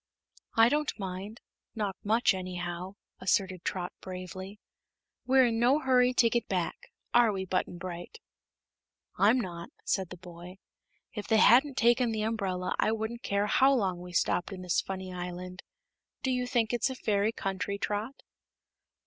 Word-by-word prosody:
"I 225 0 +7
don't 300 +3 0
mind; 195 +2 -6 0.3
not 205 -3 -2
much, 220 +2 +3
anyhow," 180 0 -5 0.2
asserted 185 -1 0
Trot, 180 -1 -3
bravely. 185 +2 -7 0.7
"We're 260 0 +6
in 225 -1 0
no 250 +5 +4
hurry 255 -3 +3
to 235 - +5
get 235 -1 0
back; 180 -3 -3 0.2
are 240 -2 +5
we, 190 -2 -3
Button 185 -1 -1
Bright?" 175 - -7 1.0
"I'm 220 +6 +5
not," 170 -6 -5 0.2
said 190 -3 0
the 180 - -9
boy. 175 +1 -11 0.6
"If 210 - -6
they 220 - +4
hadn't 260 +5 +6
taken 240 +1 +4
the 215 -1 -1
umbrella 195 -5 -1
I - - +3
wouldn't 225 +2 -3
care 200 +1 0
how 270 +6 +4
long 190 -7 0
we 180 0 -9
stopped 175 +2 0
in 185 -1 -7
this 180 -1 +1
funny 190 -1 -6
island. 180 +1 -6 0.6
Do 265 - +1
you 250 -1 0
think 240 -3 +1
it's 240 +3 +1
a 260 - -4
fairy 210 -3 +1
country, 195 -1 -3
Trot?" 210 +6 -3
200 Hz, 155 wpm, -30 LUFS, 185-235 Hz, 1.0 s, I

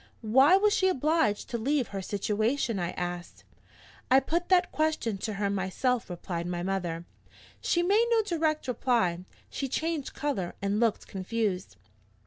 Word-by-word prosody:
"Why 265 - +6
was 415 +1 +3
she 375 - +3
obliged 310 - +1
to 235 - -2
leave 270 +2 0
her 195 -1 -4
situation?" 215 +4 -1
I 175 -1 -1
asked. 175 0 -5 0.7
"I 260 - +7
put 340 +5 -2
that 365 -1 +4
question 310 -10 0
to 215 +2 -3
her 200 0 -1
myself," 200 +6 -1
replied 175 -1 -4
my 175 -1 -3
mother. 175 -3 -2 0.6
"She 345 - +1
made 415 +6 +3
no 455 -2 +3
direct 315 -6 -1
reply 230 -9 0 0.3
she 275 - -3
changed 315 +1 -2
color, 215 -12 -2
and 200 +1 0
looked 230 -3 +1
confused. 195 - -3
230 Hz, 150 wpm, -28 LUFS, 190-310 Hz, 0.7 s, I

